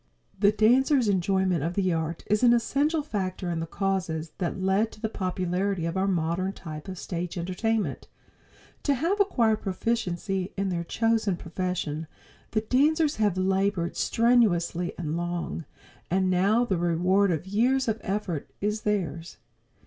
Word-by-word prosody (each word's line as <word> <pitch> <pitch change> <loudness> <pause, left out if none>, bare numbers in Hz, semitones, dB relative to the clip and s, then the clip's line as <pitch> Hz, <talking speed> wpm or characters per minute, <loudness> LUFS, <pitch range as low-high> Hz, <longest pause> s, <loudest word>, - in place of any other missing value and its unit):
The 205 0 +5
dancers' 250 +4 +4
enjoyment 190 -3 +1
of 170 +2 -2
the 185 -3 +1
art 160 0 -3
is 210 0 +1
an 240 -1 +6
essential 285 +6 +1
factor 185 -8 -3
in 165 - -2
the 165 - -3
causes 175 -5 -2
that 180 0 -2
lead 190 +4 +1
to - - -14
the 220 0 -2
popularity 185 -1 -1
of 165 +1 -2
our 190 +1 +1
modern 180 +1 0
type 155 -2 -8
of 185 -1 -6
stage 175 0 -4
entertainment. 200 +6 -1 0.7
To 285 - +2
have 340 +10 0
acquired 230 - +2
proficiency 195 -2 -2
in 195 0 0
their 170 -2 -2
chosen 220 0 +1
profession 165 -3 -3 0.4
the 215 - 0
dancers 295 +7 +2
have 205 -4 +1
labored 190 -2 0
strenuously 200 -8 +2
and 160 -2 -3
long, 175 -1 -3 0.4
and 185 +1 +2
now 200 +7 +3
the 195 -6 0
reward 180 +4 +2
of 165 -1 -1
years 245 +7 +2
of 220 0 0
effort 190 -6 -3
is 210 +1 -1
theirs. 170 -6 -2
190 Hz, 150 wpm, -27 LUFS, 175-220 Hz, 0.7 s, an